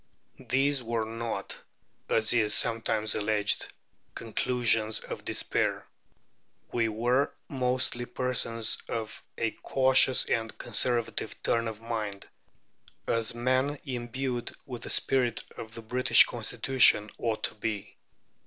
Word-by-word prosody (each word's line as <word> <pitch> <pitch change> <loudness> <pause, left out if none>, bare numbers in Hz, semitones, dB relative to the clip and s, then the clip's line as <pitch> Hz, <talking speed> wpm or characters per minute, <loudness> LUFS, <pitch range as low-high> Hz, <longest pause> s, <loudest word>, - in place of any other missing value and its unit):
These 135 +1 +2
were 115 -1 -2
not, 115 -2 -5 0.5
as 110 +1 +3
is 110 -3 +3
sometimes 110 -2 +2
alleged, 105 -1 0 0.4
conclusions 115 -1 +1
of - - -8
despair. - - -1 0.9
We 115 -2 0
were 120 +6 +1 0.2
mostly 125 -2 0
persons 115 -3 +1
of 110 -2 -5 0.2
a 115 -1 0
cautious 130 -1 +3
and 115 -1 -2
conservative 120 -2 0
turn 115 0 +1
of 110 -1 -7
mind, 110 -4 -4 0.8
as 115 0 +1
men 130 +4 0
imbued 125 -1 -4
with 125 -4 -7
the - - -7
spirit 125 -3 +1
of 115 0 -9
the 115 - -9
British 125 +3 +5
Constitution 120 -5 +3
ought 115 -2 -2
to - - -1
be. 105 -2 -5
115 Hz, 115 wpm, -28 LUFS, 110-125 Hz, 0.9 s, British